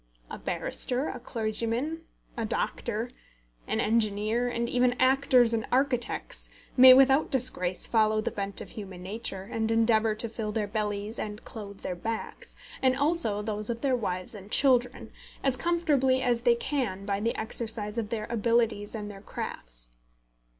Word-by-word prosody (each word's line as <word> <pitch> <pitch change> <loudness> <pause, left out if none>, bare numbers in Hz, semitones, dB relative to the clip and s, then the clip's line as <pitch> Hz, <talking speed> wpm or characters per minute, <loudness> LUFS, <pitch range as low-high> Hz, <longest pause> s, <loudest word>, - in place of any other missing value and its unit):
A - - -6
barrister, 255 +4 -2
a - - -6
clergyman, 235 +7 -2 0.3
a 230 - -2
doctor, 230 +1 -2 0.6
an - - -1
engineer, 215 +2 +1
and 235 0 -2
even 250 0 +2
actors 255 -2 +4
and 220 -1 -1
architects, 255 -2 0 0.3
may 255 0 +10
without 270 +3 +6
disgrace 185 - +1
follow 215 -1 +3
the 215 - -1
bent 200 -1 -3
of - - -9
human 190 -4 -8
nature, 195 -1 -5
and 220 +3 -2
endeavour 225 -1 +3
to 225 +2 -1
fill 220 -1 -4
their 210 -1 -1
bellies 210 0 -3
and 210 0 -5
clothe 200 -3 -9
their 185 - -3
backs, 225 +5 -5 0.3
and 260 -1 +3
also 285 -9 +1
those 210 0 -2
of 235 0 -3
their 270 -2 +2
wives 185 -5 -3
and 200 -1 -10
children, 250 0 +2 0.3
as 270 -2 +3
comfortably 280 -4 +2
as 240 -2 +1
they 240 0 +4
can 235 -7 -2
by 200 -1 -1
the 230 +3 -1
exercise 220 -1 -3
of 215 -2 -4
their 215 -2 -3
abilities 230 -2 +1
and 210 -1 -5
their 195 -1 -11
crafts. - - -7
225 Hz, 155 wpm, -28 LUFS, 210-250 Hz, 0.6 s, may